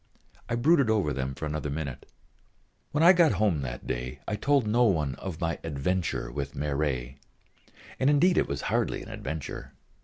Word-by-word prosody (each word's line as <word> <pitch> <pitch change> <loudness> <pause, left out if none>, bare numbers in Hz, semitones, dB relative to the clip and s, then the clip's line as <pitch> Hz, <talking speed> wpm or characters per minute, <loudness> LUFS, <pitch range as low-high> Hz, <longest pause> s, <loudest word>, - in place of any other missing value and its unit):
I 120 - 0
brooded 140 +1 +4
over 100 -10 +2
them 65 0 -3
for 75 - -5
another 75 -1 -3
minute. 70 -3 -5 0.8
When 150 +2 +2
I 175 +2 +9
got 170 -4 +5
home 95 -7 +1
that - - -5
day 60 +1 -4
I 105 - -1
told 140 +3 +2
no 115 +3 +3
one 80 - +1
of 90 -5 -6
my 85 -1 -1
"adventure" 80 +4 -2
with 70 -2 -4
Marey. 70 -3 -2 0.8
And 130 - +3
indeed 175 +5 +4
it - - +1
was 70 - -3
hardly - - -1
an - - -11
adventure. 80 -2 -6
80 Hz, 175 wpm, -28 LUFS, -, 0.8 s, I